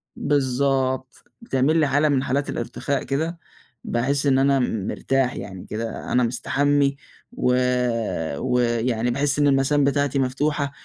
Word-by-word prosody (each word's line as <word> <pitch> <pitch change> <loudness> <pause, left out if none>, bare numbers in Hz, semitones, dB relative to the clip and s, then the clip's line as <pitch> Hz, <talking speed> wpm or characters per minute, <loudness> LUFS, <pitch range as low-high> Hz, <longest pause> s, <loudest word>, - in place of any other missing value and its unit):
بالضبط، 130 -1 0 0.2
بتعمل 150 - +1
لي 155 -2 +3
حالة 145 +2 +2
من 135 -2 +1
حالات 140 +3 -1
الارتخاء 140 -1 -3
كده، 160 +5 -2 0.4
باحِس 140 +4 -1
إن 135 -2 +3
أنا 135 0 +3
م 110 -6 -1
مرتاح 135 -1 0
يعني 95 -2 -8
كده، 115 +1 -5
أنا 125 - +3
مستحمّي، 140 +4 +1 0.4
و 125 - +1 0.8
ويعني 120 -1 0
باحِس 145 +3 0
إن 145 - +4
المَسام 140 +1 +3
بتاعتي 140 0 +1
مفتوحة 140 +2 0
135 Hz, 135 wpm, -23 LUFS, 125-145 Hz, 0.8 s, إن